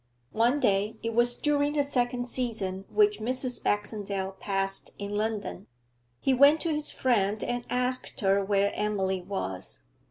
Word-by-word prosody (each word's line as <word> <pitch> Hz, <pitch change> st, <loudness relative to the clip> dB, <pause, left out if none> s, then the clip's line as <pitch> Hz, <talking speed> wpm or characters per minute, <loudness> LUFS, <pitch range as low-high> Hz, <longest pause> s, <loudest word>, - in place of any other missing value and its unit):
One 240 Hz, +6 st, +2 dB
day 200 Hz, -2 st, +1 dB
it 230 Hz, 0 st, -2 dB
was 240 Hz, +1 st, +3 dB
during 290 Hz, +1 st, +1 dB
the 290 Hz, -1 st, +2 dB
second 245 Hz, -2 st, 0 dB
season 210 Hz, -7 st, -2 dB
which 420 Hz, -1 st, +3 dB
Mrs. 255 Hz, +2 st, -1 dB
Baxendale 200 Hz, -2 st, -2 dB
passed 195 Hz, -1 st, -1 dB
in 200 Hz, 0 st, -5 dB
London 210 Hz, -2 st, -3 dB, 0.5 s
he 270 Hz, -, +2 dB
went 280 Hz, +4 st, +6 dB
to 330 Hz, -2 st, 0 dB
his 300 Hz, 0 st, +1 dB
friend 215 Hz, -4 st, +1 dB
and 245 Hz, 0 st, -3 dB
asked 250 Hz, +1 st, 0 dB
her 195 Hz, 0 st, +3 dB
where 200 Hz, 0 st, +1 dB
Emily 190 Hz, -3 st, -1 dB
was. 175 Hz, -, -5 dB
225 Hz, 150 wpm, -28 LUFS, 200-255 Hz, 0.5 s, went